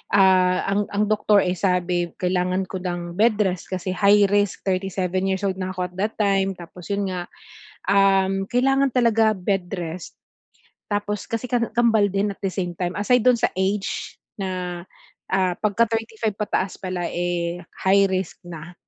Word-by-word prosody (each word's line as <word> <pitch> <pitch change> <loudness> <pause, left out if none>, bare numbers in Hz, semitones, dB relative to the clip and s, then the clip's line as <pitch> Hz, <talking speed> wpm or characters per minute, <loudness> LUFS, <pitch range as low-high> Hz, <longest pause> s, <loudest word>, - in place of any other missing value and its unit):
ah 185 -2 +4
ang 205 +1 +1
ang 205 - +2
doktor, 210 -1 +4
eh, 180 - 0
sabi 180 -2 +1
kailangan 180 +1 0
ko 190 - -3
ng 175 0 -5
bed 225 0 +4
rest, 185 -3 -2
kasi 185 0 -3
high 200 +3 +5
risk, 205 -1 +1
37 185 0 -1
years 190 +1 -1
old 190 -1 -1
na 185 0 -4
ako 180 -1 -3
at - - -23
that 210 +3 0
time, 195 -2 +1
tapos 175 0 -11
'yun 200 -1 -1
nga, 180 -1 -4 0.6
um, 195 -1 +3
kailangan 270 +4 +2
talaga 225 -3 +3
bed 190 -2 -2
rest. 175 -2 -6 0.7
Tapos 205 0 -2
kasi 230 +1 -2
ka 245 -1 0
kambal 225 -4 +3
din 200 +1 0
at - - -35
the 195 - 0
same 180 -2 -3
time. 175 +1 -3
Aside 245 +4 +3
dun 250 0 +4
sa 235 - +3
age 195 +2 -2 0.2
na, 180 -2 -4 0.5
ah, 185 -2 +2
'pagka 215 +2 +3
35 225 -1 -2
pataas 200 -2 -2
pala 185 -2 -4
eh, 175 0 -2 0.2
high 195 0 +5
risk 185 -1 -3
na, 175 -1 -9
190 Hz, 170 wpm, -23 LUFS, 180-205 Hz, 0.7 s, high